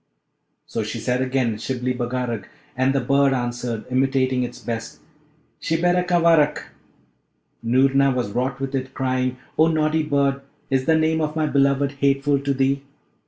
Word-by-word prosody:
So - - -3
she - - -4
said 125 0 -1
again, 130 -4 0
'Shibli 125 +1 -2
Bagarag.' 120 -3 -3 0.3
And 130 +1 +2
the 135 - +2
bird 140 +2 +3
answered, 120 -2 -3
imitating 130 0 +1
its 120 -1 -4
best, 115 -1 -5 0.6
'Shibberacavarack.' 170 -2 +2 0.9
Noorna 135 +3 +3
was 125 -5 -2
wroth 125 +3 -2
with 135 0 -4
it, 130 0 -4
crying, 130 -1 -1 0.2
'Oh 160 - +6
naughty 155 0 +1
bird! 140 -2 0 0.3
is 130 -1 +1
the 160 - +4
name 160 0 +1
of 155 0 -2
my 155 -1 +1
beloved 140 -1 +2
hateful 140 0 +2
to 140 0 -2
thee?' 135 +1 +1
135 Hz, 145 wpm, -22 LUFS, 125-145 Hz, 0.9 s, Oh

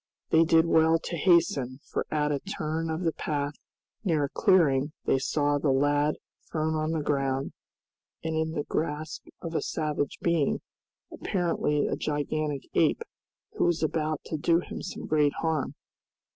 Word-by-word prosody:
They 160 +1 +6
did 160 0 +5
well 160 0 +4
to 170 +1 -5
hasten, 150 -7 +2
for - - -2
at 150 -1 +1
a 145 - 0
turn 165 -3 -3
of 160 +3 -2
the 165 - +2
path 145 -2 -2 0.5
near 160 -7 +2
a 140 - -1
clearing 150 -6 +3
they 135 - +3
saw 145 +1 +1
the 145 - +1
lad 145 +2 +2 0.4
thrown 160 -1 0
on 155 0 0
the 155 -2 -1
ground 135 -2 0 0.7
and 160 0 -2
in 160 0 0
the 150 -3 -1
grasp 155 0 -3 0.2
of 165 -1 -4
a - - 0
savage 150 -3 -2
being, 170 -4 +1 0.5
apparently 170 -5 0
a - - 0
gigantic 150 -1 -2
ape, - - +2 0.5
who - - 0
was 175 -2 +1
about 155 -1 0
to 160 - -3
do 165 +2 +3
him - - -7
some - - -6
great 150 -2 +2
harm. 160 -4 -1
155 Hz, 160 wpm, -28 LUFS, 145-160 Hz, 0.7 s, They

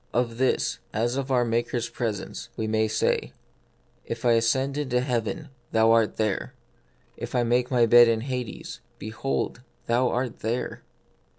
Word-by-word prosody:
Of 120 -1 0
this, 130 - +1
as 120 +3 0
of 135 0 -2
our 125 -2 +3
Maker's 120 +1 -1
presence, 110 -6 -4
we 110 - -1
may 110 0 +1
say, 110 - 0 0.4
" - - -39
If 115 +1 -9
I 120 - +5
ascend 130 +4 +2
into 130 -4 0
heaven, 125 +4 -2 0.2
thou 110 0 +5
art 115 -2 +3
there: 100 - -1 0.6
if - - -6
I 120 - +3
make 120 +1 +1
my 120 -2 +4
be* 120 +1 +8
4 115 - +3
in 110 - -2
Hades, 125 -2 -5 0.2
behold, 110 +4 -3 0.2
thou 120 +2 +2
art 125 -1 -2
there. 115 +3 -3
120 Hz, 165 wpm, -26 LUFS, 115-125 Hz, 0.6 s, be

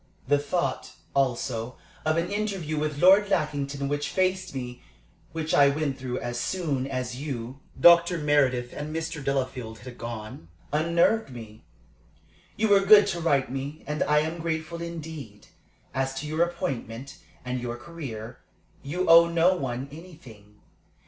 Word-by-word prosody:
The 145 +1 +4
thought, 160 +5 -2 0.2
also, 125 -3 -1 0.3
of 155 +1 +2
an 170 +3 -1
interview 195 -7 -2
with 150 -1 -2
Lord 195 +4 +6
Lackington 145 -4 -1
which 145 0 -2
faced 185 -2 0
me, 125 -1 -6 0.5
which 160 0 -3
I 140 -1 +6
went 140 -2 -2
through 125 -1 -3
as 120 0 -4
soon 145 -6 -1
as 125 -2 -3
you, 130 -2 -5 0.2
Dr. 170 0 +7
Meredith, 135 -5 +2
and 150 +2 -5
Mr. 160 -2 -4
Delafield 130 -4 -2
had 125 +2 -11
gone, 110 -7 -7 0.3
unnerved 170 +6 +2
me. 110 -4 -11 0.9
You 220 +1 +2
were 200 -1 +7
good 205 +1 +7
to 175 -3 -2
write 140 -5 +2
to - - -12
me, 140 +3 -5
and 150 +1 -3
I 150 0 +3
am 160 +2 -3
grateful 165 +1 -3
indeed. 160 -10 -7 0.5
As 135 0 -1
to 135 +3 -4
your 155 +2 -1
appointment, 140 -8 -3 0.3
and 125 0 -3
your 120 0 -4
career, 120 -5 -8 0.4
you 175 +7 -2
owe 170 0 +8
no 170 +2 +3
one 130 -3 -3
anything. 125 - -14
145 Hz, 150 wpm, -26 LUFS, 125-170 Hz, 0.9 s, owe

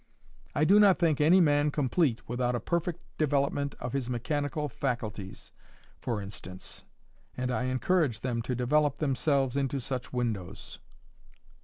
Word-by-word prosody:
I 150 - +2
do 200 +5 +6
not 200 -3 +6
think 160 -4 +2
any 170 +5 +6
man 145 -3 +4
complete 140 -3 0
without 125 +1 0
a - - 0
perfect 170 +2 -2 0.2
development 140 -1 +1
of 120 -1 -5
his 135 -3 -2
mechanical 145 +4 -1
faculties, 110 -8 -4 0.5
for 115 -4 -2
instance, 95 -2 -8 0.5
and 125 0 -1
I 125 +1 0
encourage 130 - +1
them 120 -3 -1
to 125 +2 -2
develop 145 +4 +2
themselves 135 -2 +1
into 140 0 0
such 125 -2 -4
windows." 110 -7 -4
135 Hz, 140 wpm, -29 LUFS, 120-150 Hz, 0.5 s, do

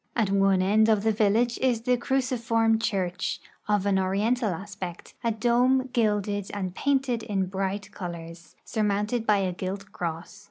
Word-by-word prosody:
At 215 -5 +1
one 195 -1 +3
end 215 +3 +4
of 215 -2 +3
the 220 - +3
vil 210 -2 +2
lage 240 +1 +1
is 250 -3 +1
the 250 +1 +2
cruciform 235 -3 +1
church, 185 -5 -1 0.3
of 205 -2 +1
an 195 -1 +2
oriental 210 +5 +1
aspect, 185 -1 -7
a 230 - +2
dome 245 +3 +2
gilded 205 -4 0
and 185 -3 -3
painted 270 -1 0
in 195 -3 -1
bright 195 +2 -3
colors, 170 -3 -8
surmounted 210 +2 -1
by 210 - +5
a 190 -2 0
gilt 195 +3 -5
cross. 170 +3 -5
205 Hz, 160 wpm, -26 LUFS, 190-230 Hz, 0.3 s, by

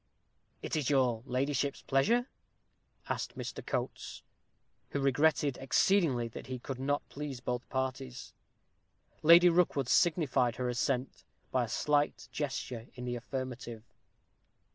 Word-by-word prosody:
"Is - - -2
it 150 -5 0
your 125 -5 +2
ladyship's 140 +2 -1
pleasure?" 230 - +2 0.8
asked - - -3
Mr. - - -5
Coates, - - -4 0.7
who 140 - -2
regretted 140 0 +2
exceedingly 135 -4 +2
that - - -9
he 130 0 -4
could 130 +1 -6
not 145 +2 -1
please 140 -3 -6
both 125 0 -4
parties. 130 -1 -4 0.9
Lady 170 +3 +8
Rookwood 165 -6 +3
signified 145 -8 +3
her 125 - -2
assent 125 +1 -1 0.3
by 130 -2 +2
a - - -10
slight 145 +5 +1
gesture 130 -5 -4
in 125 -1 -6
the 120 0 -2
affirmative. 120 -2 -5
135 Hz, 120 wpm, -32 LUFS, 125-145 Hz, 0.9 s, Lady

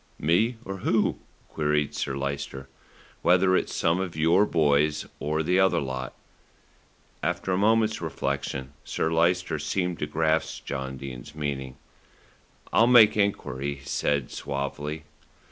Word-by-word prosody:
"Me 110 - +2
or 95 0 -5
who?" 105 +3 +1 0.3
queried 75 -1 0
Sir 70 - -3
Lyster. 70 -1 -4 0.5
"Whether 90 +1 +4
it's - - 0
some 85 +2 +2
of 90 -4 -3
your 85 +6 +4
boys, 75 -2 +2
or 75 +2 -1
the 90 +4 +2
other 95 0 +4
lot." 65 -2 -4 1.1
After 95 - -1
a 90 - +2
moment's 110 0 +2
reflection 70 -4 -3
Sir 80 - -1
Lyster 85 -1 +1
seemed 90 +2 -2
to 75 - -2
grasp 80 +1 0
John 65 -1 -4
Dene's 70 +2 -8
meaning. 70 -3 -4 1.0
"I'll 115 - +5
make 115 -4 +7
enquiry," 70 -9 -1
he 70 0 -16
said 70 0 -1
suavely. 75 +2 -4
80 Hz, 130 wpm, -26 LUFS, 70-90 Hz, 1.1 s, make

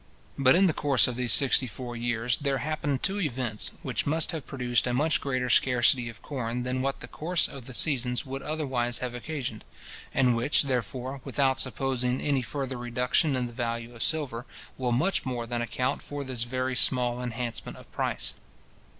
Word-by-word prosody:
But, 130 -1 +5
in 190 +2 +6
the 170 - +3
course 140 -4 +3
of 125 - -3
these 125 -1 +1
sixty 135 -2 +5
four 120 0 -6
years, 120 0 0
there 140 -2 0
happened 145 0 -2
two 200 +1 +1
events, 125 - -1
which - - -1
must 160 +3 +2
have 160 -4 -5
produced 125 -2 +1
a 120 - 0
much 155 +4 +2
greater 130 -2 -1
scarcity 125 -1 +4
of 115 - -12
corn 125 -3 -3
than 130 +1 -1
what 135 +1 -1
the - - -7
course 165 0 +1
of 135 -4 -9
the 130 - -7
seasons 125 -3 +2
would 135 +1 -5
otherwise 130 -6 -1
have 125 -1 -4
occasioned, 125 -3 -5 0.5
and 125 -3 +3
which, 125 +7 +3
therefore, 130 +1 -2
without 135 -1 +1
supposing 130 0 0
any 140 -3 +1
further 135 0 -4
reduction 125 +5 +1
in 125 -1 0
the 120 - -7
value 115 0 -3
of 115 - -10
silver, 135 -6 -1 0.3
will 125 -2 -1
much 155 +12 +2
more 125 -3 -3
than 120 0 -2
account 125 +2 -1
for 145 -1 -5
this 125 -3 -1
very 130 +1 -1
small 125 0 +1
enhancement 120 -1 -4
of - - -15
price. - - -1
130 Hz, 185 wpm, -28 LUFS, 120-140 Hz, 0.5 s, in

